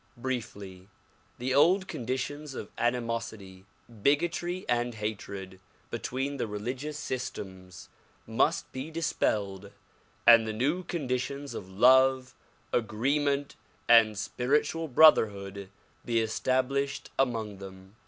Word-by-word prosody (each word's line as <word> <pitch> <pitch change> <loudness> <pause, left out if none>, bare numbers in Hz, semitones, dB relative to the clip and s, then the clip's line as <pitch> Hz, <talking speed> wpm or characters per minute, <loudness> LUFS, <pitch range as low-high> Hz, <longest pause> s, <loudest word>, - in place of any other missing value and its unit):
Briefly; 100 -7 -5 0.5
the 130 +2 -2
old 185 +7 +4
con 120 - -6
ditions 135 +2 -3
of 105 - -7
animosity, 115 -5 -3 0.4
bigotry 175 - 0
and 120 -1 0
hatred 100 -3 -6 0.3
between 135 +2 -3
the 120 - -2
religious 125 +8 -4
sys 130 -3 -3
tems 95 -1 -10 0.4
must - - 0
be 130 +4 -6
dispelled 105 - -1 0.6
and 115 -1 +7
the 110 - -2
new 145 +11 0
conditions 140 -3 -3
of 95 - -7
love, 130 +5 +4 0.4
agreement 140 +6 0 0.3
and 115 -3 +6
spiritual 150 +9 0
brotherhood 100 -9 +4 0.3
be 115 -1 +1
established 130 +5 -1
among 110 -6 -1
them. 95 +1 -12
120 Hz, 105 wpm, -29 LUFS, 105-140 Hz, 0.6 s, and